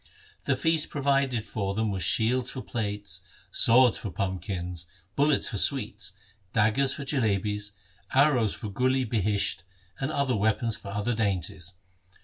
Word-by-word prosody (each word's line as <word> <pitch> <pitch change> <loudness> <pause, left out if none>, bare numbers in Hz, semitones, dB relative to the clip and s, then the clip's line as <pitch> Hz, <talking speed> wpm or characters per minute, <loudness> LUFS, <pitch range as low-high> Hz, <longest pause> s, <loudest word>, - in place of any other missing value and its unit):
The - - +2
feast 160 -2 +1
provided 135 -5 +1
for 100 -2 -3
them 110 -1 0
was 95 -1 -3
shields 120 +7 +2
for 130 - -6
plates, 105 -5 -4 0.3
swords 125 +1 +5
for 105 - -5
pumpkins, 90 -2 -4 0.3
bullets 145 0 +3
for - - -2
sweets, - - 0 0.4
daggers 115 +5 +3
for 140 - -6
jalebis, 105 -6 0 0.4
arrows 130 -6 +3
for 110 - -6
gul 130 +6 +1
i 130 - +1
bihisht, 105 -4 0 0.4
1 135 - -1
and - - -3
other 140 -4 +1
weapons 110 +2 +1
for - - -11
other 105 +4 -1
dainties. 95 -5 -2
110 Hz, 145 wpm, -27 LUFS, 100-130 Hz, 0.4 s, swords